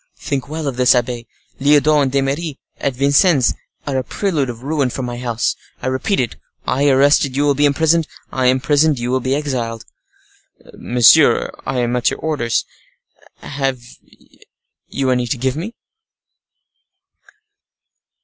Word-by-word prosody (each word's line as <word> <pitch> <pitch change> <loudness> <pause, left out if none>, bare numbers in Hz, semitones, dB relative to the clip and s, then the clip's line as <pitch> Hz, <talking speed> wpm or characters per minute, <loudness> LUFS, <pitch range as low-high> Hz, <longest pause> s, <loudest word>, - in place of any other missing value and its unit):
"Think 140 -2 -4
well 155 -1 -4
of 130 -3 -3
this, 125 0 +5
abbe, 120 -1 -2 0.3
Lyodot 150 +1 +4
and 135 -2 0
D'Eymeris 140 +3 -1 0.2
at 135 -2 -2
Vincennes 140 - +3 0.3
are 140 -2 -2
a - - -3
prelude 155 -3 -1
of 120 0 -8
ruin 145 -2 0
for 130 - -5
my 120 -1 -5
house. 120 -2 -1 0.2
I - - -8
repeat 130 +10 0
it—I 130 +3 -2
arrested, 140 0 +3
you 145 - +2
will 145 -1 +3
be 145 +1 +3
imprisoned—I 155 -3 0
imprisoned, 140 +3 +2
you 120 +1 -3
will 130 - +1
be 130 +2 -1
exiled." 120 -6 -3 0.9
"Monsieur, 120 -1 +4 0.2
I 130 -2 -1
am 120 0 -1
at 125 - +2
your - - -5
orders; 145 -7 -1 0.8
have 135 -2 -2 1.1
you 135 -2 -1
any 125 -1 0
to 125 - -2
give 130 +2 -1
me?" 190 +10 -6
135 Hz, 140 wpm, -18 LUFS, 125-145 Hz, 1.1 s, this